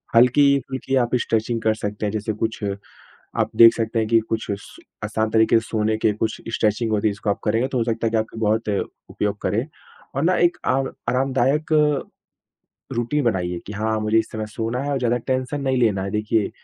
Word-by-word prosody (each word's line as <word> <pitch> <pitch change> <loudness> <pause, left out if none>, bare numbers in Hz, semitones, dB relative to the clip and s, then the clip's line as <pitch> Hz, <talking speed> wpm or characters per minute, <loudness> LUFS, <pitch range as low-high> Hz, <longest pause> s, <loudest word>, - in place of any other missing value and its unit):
हल्की-फुल्की 135 +1 +3
आप 120 -2 +2
स्ट्रेचिंग 115 +1 -1
कर 110 0 +2
सकते 105 0 -4
हैं, 105 - -1
जैसे 110 0 -2
कुछ 110 +1 -3 0.8
आप - - +1
देख 115 0 +9
सकते 115 0 -1
हैं 110 -1 0
कि 115 0 +5
कुछ 115 0 -1
स 100 0 -8 0.3
आसान 110 +1 -1
तरीके 110 +1 +4
सोने 110 -1 -1
के 110 -1 +2
कुछ 110 +1 -3
स्ट्रेचिंग 110 -1 +1
होती 110 0 +2
है 105 - -1
इसको 100 +1 -3
आप 100 - -1
करेंगे 115 +4 +1
तो 130 - -2
हो 115 - +1
सकता 115 0 -1
है 110 -1 +2
कि - - -8
बहुत 110 0 +1 0.4
उपयोग 105 0 -2
करें। 105 +7 0 0.5
और 140 - 0
ना 185 +2 +3
एक 175 0 +3
आव 135 +1 +2 0.2
आरामदायक 135 +4 +1 1.2
रूटीन 120 +5 0
बनाइए 90 -6 0
कि 105 - -6
हाँ, 110 +1 -1
मुझे 110 +1 +2
इस 110 - -1
समय 110 -1 -3
सोना 115 +3 -3
है 145 - -2
और 140 - 0
ज़्यादा 120 -1 +1
टेंशन 130 +3 -2
नहीं 130 -1 +1
लेना 105 -5 +2
है। 100 - -3
देखिए 105 0 0
115 Hz, 200 wpm, -22 LUFS, 110-125 Hz, 1.2 s, देख